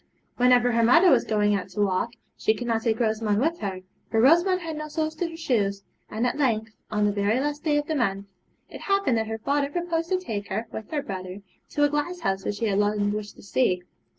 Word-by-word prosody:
Whenever 245 Hz, 0 st, +4 dB
her 230 Hz, 0 st, +2 dB
mother 330 Hz, +10 st, +6 dB
was -, -, +4 dB
going 210 Hz, -1 st, +1 dB
out 195 Hz, -3 st, -2 dB
to -, -, -8 dB
walk, 205 Hz, +3 st, +1 dB, 0.2 s
she 220 Hz, -, +1 dB
could 245 Hz, -, -5 dB
not 230 Hz, -1 st, 0 dB
take 225 Hz, -1 st, 0 dB
Rosamond 215 Hz, -2 st, +1 dB
with 325 Hz, +6 st, 0 dB
her, 190 Hz, -2 st, -4 dB, 0.3 s
for 225 Hz, -, +1 dB
Rosamond 345 Hz, +9 st, +4 dB
had 325 Hz, -2 st, -5 dB
no 305 Hz, 0 st, -5 dB
soles 310 Hz, +1 st, -2 dB
to 335 Hz, +2 st, -3 dB
her 325 Hz, -, -9 dB
shoes; 200 Hz, -10 st, 0 dB, 0.3 s
and 220 Hz, +3 st, -1 dB
at 250 Hz, +4 st, -1 dB
length, 225 Hz, -5 st, +1 dB, 0.2 s
on 210 Hz, -1 st, +1 dB
the 205 Hz, -, +2 dB
very 205 Hz, +4 st, +1 dB
last 295 Hz, +1 st, -2 dB
day 300 Hz, -2 st, +2 dB
of 295 Hz, -, 0 dB
the 315 Hz, -, -2 dB
month, 200 Hz, -8 st, 0 dB, 0.4 s
it -, -, -10 dB
happened 395 Hz, -10 st, +1 dB
that 220 Hz, -, -2 dB
her 220 Hz, 0 st, -3 dB
father 280 Hz, +5 st, 0 dB
proposed 335 Hz, +1 st, -2 dB
to 370 Hz, -, +2 dB
take 215 Hz, -, -5 dB
her, 215 Hz, +4 st, -3 dB
with 220 Hz, -, -7 dB
her 295 Hz, -2 st, -2 dB
brother, 190 Hz, -3 st, -6 dB, 0.3 s
to 295 Hz, -, 0 dB
a 290 Hz, -, +5 dB
glasshouse 295 Hz, -, -2 dB
which 205 Hz, -, -2 dB
she 230 Hz, -, -2 dB
had 200 Hz, -2 st, +1 dB
long 205 Hz, 0 st, +1 dB
wished 210 Hz, 0 st, -5 dB
to -, -, -15 dB
see. 195 Hz, -4 st, +1 dB
230 Hz, 235 wpm, -25 LUFS, 205-295 Hz, 0.4 s, mother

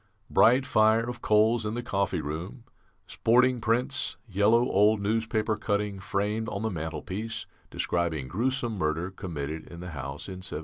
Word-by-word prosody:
"Bright 125 Hz, +3 st, +5 dB
fire 110 Hz, +1 st, +3 dB
of 120 Hz, -1 st, -6 dB
coals 110 Hz, +2 st, +3 dB
in 105 Hz, +1 st, -3 dB
the 120 Hz, -, -3 dB
coffee 100 Hz, -6 st, -1 dB
room, 80 Hz, -, -6 dB, 0.4 s
sporting 125 Hz, +1 st, +3 dB
prints, 125 Hz, +4 st, 0 dB
yellow 105 Hz, +4 st, +3 dB
old 105 Hz, +2 st, +4 dB
newspaper 110 Hz, +1 st, 0 dB
cutting 105 Hz, -1 st, -1 dB
framed 105 Hz, +3 st, -1 dB
on 100 Hz, -, -4 dB
the 110 Hz, -, 0 dB
mantelpiece 85 Hz, -, -4 dB, 0.2 s
describing 80 Hz, -6 st, -1 dB
gruesome 120 Hz, -, -1 dB
murder 80 Hz, +4 st, -1 dB
committed 80 Hz, -4 st, -5 dB
in 85 Hz, -, -10 dB
the 90 Hz, 0 st, -7 dB
house 70 Hz, 0 st, -6 dB
in 95 Hz, -2 st, -6 dB
1760. 90 Hz, -, -5 dB
105 Hz, 150 wpm, -28 LUFS, 90-115 Hz, 0.4 s, Bright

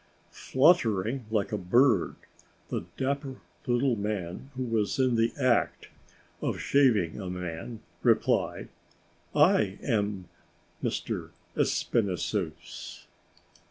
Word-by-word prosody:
Fluttering 125 Hz, -, +2 dB
like 105 Hz, -3 st, 0 dB
a 105 Hz, -, -1 dB
bird, 110 Hz, +3 st, +3 dB, 0.5 s
the -, -, -3 dB
dapper 140 Hz, 0 st, -2 dB, 0.3 s
little 120 Hz, +1 st, +2 dB
man, 100 Hz, +2 st, -4 dB
who 130 Hz, -, -2 dB
was 115 Hz, -1 st, 0 dB
in 130 Hz, -2 st, +3 dB
the 115 Hz, 0 st, +2 dB
act 130 Hz, -3 st, +1 dB, 0.5 s
of -, -, -2 dB
shaving 110 Hz, -, +2 dB
a 95 Hz, -, -5 dB
man, 90 Hz, +5 st, -5 dB, 0.2 s
replied: -, -, +1 dB, 0.7 s
"I 100 Hz, -2 st, +4 dB
am 100 Hz, -6 st, -1 dB, 0.5 s
Monsieur -, -, -3 dB, 0.3 s
Espinassous." 95 Hz, -4 st, -2 dB
110 Hz, 95 wpm, -28 LUFS, 95-130 Hz, 0.7 s, I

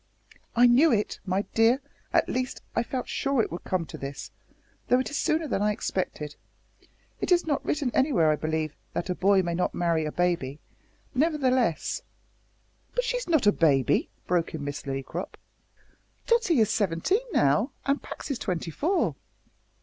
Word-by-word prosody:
"I 240 Hz, +1 st, +6 dB
knew 260 Hz, +7 st, +6 dB
it, 210 Hz, -2 st, 0 dB
my 190 Hz, +2 st, +1 dB
dear 225 Hz, +3 st, +4 dB, 0.3 s
at -, -, +3 dB
least 255 Hz, 0 st, -3 dB
I -, -, +3 dB
felt 250 Hz, +2 st, -4 dB
sure 275 Hz, -2 st, 0 dB
it -, -, -5 dB
would 170 Hz, -, -6 dB
come 185 Hz, -3 st, -1 dB
to -, -, -9 dB
this, 135 Hz, 0 st, -6 dB, 0.6 s
though 250 Hz, -, +4 dB
it 260 Hz, -, -2 dB
is 290 Hz, -, -2 dB
sooner 315 Hz, 0 st, +1 dB
than 215 Hz, -, -1 dB
I 210 Hz, 0 st, +3 dB
expected. 150 Hz, -7 st, -3 dB, 0.8 s
It -, -, -2 dB
is 350 Hz, -1 st, +4 dB
not 290 Hz, -4 st, 0 dB
written 285 Hz, -4 st, -1 dB
anywhere, 230 Hz, -, +3 dB
I -, -, +2 dB
believe, 155 Hz, 0 st, -2 dB, 0.2 s
that 180 Hz, -, -2 dB
a -, -, +2 dB
boy 195 Hz, +1 st, +3 dB
may 170 Hz, -1 st, -2 dB
not 180 Hz, +2 st, -1 dB
marry 165 Hz, -2 st, +1 dB
a 150 Hz, -, -2 dB
baby, 170 Hz, -6 st, -1 dB, 0.5 s
nevertheless 260 Hz, -, +1 dB, 0.5 s
" -, -, -39 dB
"But -, -, +2 dB
she's -, -, -2 dB
not 315 Hz, -9 st, +3 dB
a 205 Hz, -, +7 dB
baby," 140 Hz, -, +2 dB, 0.2 s
broke 170 Hz, -2 st, 0 dB
in 150 Hz, -, -5 dB
Miss 145 Hz, 0 st, -5 dB
Lillycrop. 135 Hz, 0 st, -4 dB, 0.9 s
"Tottie 465 Hz, -, +3 dB
is 215 Hz, 0 st, +3 dB
seventeen 205 Hz, -, +1 dB
now, 145 Hz, -, +3 dB, 0.2 s
and 275 Hz, +1 st, +1 dB
Pax -, -, -7 dB
is 260 Hz, -, -2 dB
twenty 175 Hz, -5 st, -3 dB
four. 345 Hz, -, +1 dB
205 Hz, 175 wpm, -27 LUFS, 165-275 Hz, 0.9 s, a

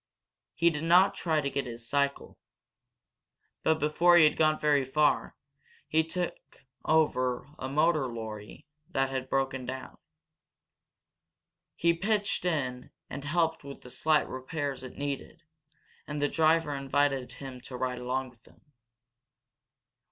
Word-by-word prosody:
He 170 Hz, +1 st, +4 dB
did 150 Hz, 0 st, -4 dB
not 175 Hz, +4 st, +5 dB
try 160 Hz, -3 st, 0 dB
to 140 Hz, -, -1 dB
get 140 Hz, -2 st, -2 dB
his 115 Hz, -1 st, -7 dB
cycle. 140 Hz, +2 st, -1 dB, 1.2 s
But 160 Hz, -, +3 dB
before 170 Hz, +3 st, +4 dB
he 170 Hz, -, +8 dB
had 150 Hz, -, +5 dB
gone 155 Hz, -1 st, +3 dB
very 145 Hz, -2 st, +3 dB
far 150 Hz, +3 st, +1 dB, 0.5 s
he 160 Hz, -, +2 dB, 0.8 s
over 130 Hz, -6 st, +2 dB
took 145 Hz, +2 st, -22 dB
a 130 Hz, -, -4 dB
motor 155 Hz, 0 st, +2 dB
lorry 110 Hz, -3 st, -8 dB, 0.2 s
that 135 Hz, 0 st, 0 dB
had 130 Hz, -1 st, -3 dB
broken 135 Hz, -1 st, -1 dB
down. 130 Hz, 0 st, -7 dB, 1.8 s
He 170 Hz, 0 st, +3 dB
pitched 205 Hz, +2 st, 0 dB
in 130 Hz, -7 st, -2 dB, 0.2 s
and 140 Hz, -, -5 dB
helped 165 Hz, +1 st, 0 dB
with 140 Hz, 0 st, -9 dB
the 125 Hz, -, -11 dB
slight 155 Hz, +2 st, +2 dB
repairs 135 Hz, +1 st, -4 dB
it 130 Hz, -, -10 dB
needed, 145 Hz, +4 st, -5 dB, 0.6 s
and 150 Hz, 0 st, -4 dB
the 145 Hz, -, +2 dB
driver 160 Hz, -1 st, +2 dB
invited 140 Hz, -1 st, 0 dB
him 130 Hz, -2 st, -9 dB
to 125 Hz, 0 st, -8 dB
ride 125 Hz, 0 st, -2 dB
along 130 Hz, +1 st, -2 dB
with 120 Hz, -2 st, -26 dB
him. -, -, -21 dB
140 Hz, 135 wpm, -29 LUFS, 130-160 Hz, 1.8 s, he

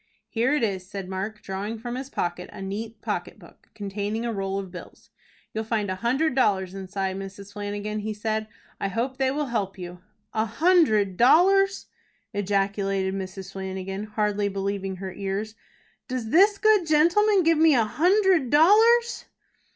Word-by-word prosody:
"Here 240 Hz, +4 st, +1 dB
it 285 Hz, -, 0 dB
is," 190 Hz, -4 st, -2 dB
said 195 Hz, -2 st, -6 dB
Mark, 195 Hz, +3 st, -5 dB
drawing 200 Hz, +4 st, -4 dB
from 240 Hz, +2 st, -6 dB
his 260 Hz, +2 st, -5 dB
pocket 175 Hz, -6 st, -3 dB
a -, -, -10 dB
neat 210 Hz, +4 st, -6 dB
pocket -, -, -3 dB
book, -, -, -19 dB
containing 205 Hz, +2 st, -3 dB
a 235 Hz, -, -2 dB
roll 195 Hz, -1 st, -2 dB
of 195 Hz, -2 st, -5 dB
bills. 180 Hz, -, -12 dB, 0.4 s
"You'll 220 Hz, -, -2 dB
find 215 Hz, -3 st, -1 dB
a 185 Hz, -, -3 dB
hundred 265 Hz, +6 st, +1 dB
dollars 190 Hz, -8 st, +1 dB
inside, 190 Hz, 0 st, -3 dB
Mrs. 195 Hz, +1 st, -9 dB
Flanagan," 205 Hz, +1 st, -4 dB
he 215 Hz, +1 st, -3 dB
said. 215 Hz, +1 st, -2 dB, 0.3 s
"I -, -, -1 dB
hope 235 Hz, +6 st, -2 dB
they 265 Hz, -1 st, +2 dB
will 295 Hz, +3 st, -1 dB
help 210 Hz, -6 st, -2 dB
you." 180 Hz, -1 st, -8 dB, 0.3 s
"A 220 Hz, 0 st, +1 dB
hundred 225 Hz, -, +3 dB
dollars!" 385 Hz, +9 st, +4 dB, 0.5 s
ejaculated 195 Hz, -1 st, 0 dB
Mrs. 190 Hz, 0 st, -6 dB
Flanagan, 190 Hz, +1 st, -5 dB
hardly 210 Hz, -1 st, -1 dB
believing 195 Hz, -1 st, -3 dB
her 190 Hz, 0 st, -6 dB
ears. 200 Hz, +3 st, -4 dB, 0.5 s
"Does 250 Hz, -4 st, -4 dB
this 400 Hz, -, +5 dB
good 425 Hz, -5 st, +3 dB
gentleman 355 Hz, +6 st, +4 dB
give 330 Hz, -1 st, +3 dB
me 320 Hz, -2 st, +6 dB
a 235 Hz, -, +4 dB
hundred 360 Hz, -, +3 dB
dollars!" 445 Hz, -, +5 dB
210 Hz, 160 wpm, -25 LUFS, 195-270 Hz, 0.5 s, me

